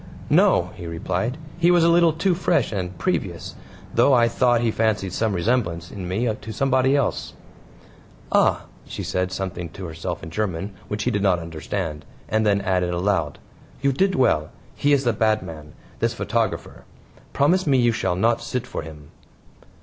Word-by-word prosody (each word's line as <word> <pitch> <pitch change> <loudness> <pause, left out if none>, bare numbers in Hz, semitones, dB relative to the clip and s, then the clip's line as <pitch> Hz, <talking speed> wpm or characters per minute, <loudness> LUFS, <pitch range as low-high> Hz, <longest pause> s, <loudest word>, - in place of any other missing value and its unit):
"No," - - +4
he 85 - -7
replied. 90 - -2 0.2
"He 170 0 +4
was 175 -1 +5
a - - +5
little 170 0 +5
too 175 +4 +1
fresh 175 - +1
and 90 -4 -4
previous, - - -2 0.4
though 125 +4 +4
I 120 -1 +5
thought 120 0 +2
he 115 -2 +1
fancied 105 -4 0
some 110 +1 0
resemblance 85 -5 -1
in 95 -3 -6
me 105 +7 -1
to 110 +1 -8
somebody 130 +2 +2
else." 140 - -1 1.0
"Ah!" - - +3 0.2
She - - -5
said 90 0 -1
something 90 -2 -4
to 95 +3 -8
herself 80 -1 -5
in 80 - -7
German 100 -1 -2
which 105 +1 -3
he 125 - +1
did 105 -3 0
not 95 -3 +3
understand, 80 0 -4 0.2
and 110 0 +1
then 100 -1 +3
added 90 -2 0
aloud: 85 -5 0 0.5
"You 140 - +4
did 190 +8 +1
well; 80 -12 +2 0.3
he 145 - +1
is 140 -2 +3
a 120 - +3
bad 110 -1 +1
man, 75 -2 -9 0.3
this - - 0
photographer. - - -2 0.5
Promise 175 +5 +2
me 135 -2 +4
you 120 -1 +4
shall 100 -5 -1
not 115 +5 +2
sit 125 +1 -3
for - - -5
him." 75 -2 -11
105 Hz, 175 wpm, -23 LUFS, 90-125 Hz, 1.0 s, was